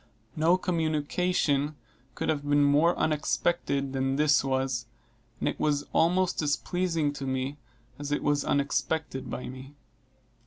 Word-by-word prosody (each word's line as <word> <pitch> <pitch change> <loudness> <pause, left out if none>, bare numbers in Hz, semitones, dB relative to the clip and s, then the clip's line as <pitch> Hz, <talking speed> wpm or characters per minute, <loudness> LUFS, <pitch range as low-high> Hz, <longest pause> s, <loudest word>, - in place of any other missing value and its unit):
No 165 +3 +4
communication 155 -3 0 0.4
could - - -3
have 150 -2 +1
been 145 0 +4
more 150 +5 +4
unexpected 140 -2 0
than 135 0 0
this 150 0 +4
was, 130 -3 -1 0.5
and - - -1
it - - -2
was 145 -1 +1
almost 180 +2 +2
as 145 -2 +2
pleasing 165 -5 -1
to 140 -1 -5
me 130 +2 -2 0.4
as 145 0 -5
it 145 - 0
was 145 -1 +2
unexpected 145 0 -1
by 125 - -5
me. 130 +3 -10
145 Hz, 140 wpm, -28 LUFS, 140-160 Hz, 0.5 s, No